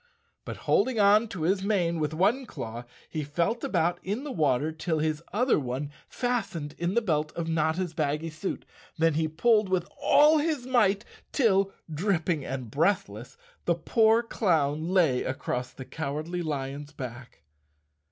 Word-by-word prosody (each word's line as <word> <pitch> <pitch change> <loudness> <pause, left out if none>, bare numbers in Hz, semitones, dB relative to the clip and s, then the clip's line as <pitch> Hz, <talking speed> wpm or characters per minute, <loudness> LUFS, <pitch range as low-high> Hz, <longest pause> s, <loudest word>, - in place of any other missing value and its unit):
But - - -6
holding 255 -4 +2
on 210 +3 +5
to 180 -7 -5
his 190 +4 +2
mane 180 -5 +1
with 150 -1 -1
one 210 +11 +1
claw, 120 - -6 0.2
he 155 -2 -4
felt 170 +11 -1
about 175 -1 +1
in 210 +8 -3
the 295 - -5
water 150 - +1
till 160 +1 -2
his 155 0 -1
other 245 - +2
one 135 +2 -4 0.2
fastened 200 - -2
in 175 +3 -1
the 235 - +2
belt 155 -5 0
of 170 -1 -4
Notta's 165 +2 0
baggy 155 0 -1
suit. 155 +5 -5 0.3
Then 165 0 +3
he 160 +1 +1
pulled 210 +6 +2
with 185 -1 0
all 300 +2 +6
his 295 -4 -1
might 215 -6 +2 0.3
till, 195 -7 +3 0.2
dripping 170 -3 0
and 130 -4 -5
breathless, 135 - -1 0.3
the 170 - +2
poor 220 +7 +3
clown 160 -8 0
lay 165 -9 +3
across 125 -1 -3
the 130 - -9
Cowardly 155 +5 -4
Lion's 145 -2 -4
back. 125 - -9
165 Hz, 155 wpm, -27 LUFS, 150-200 Hz, 0.3 s, all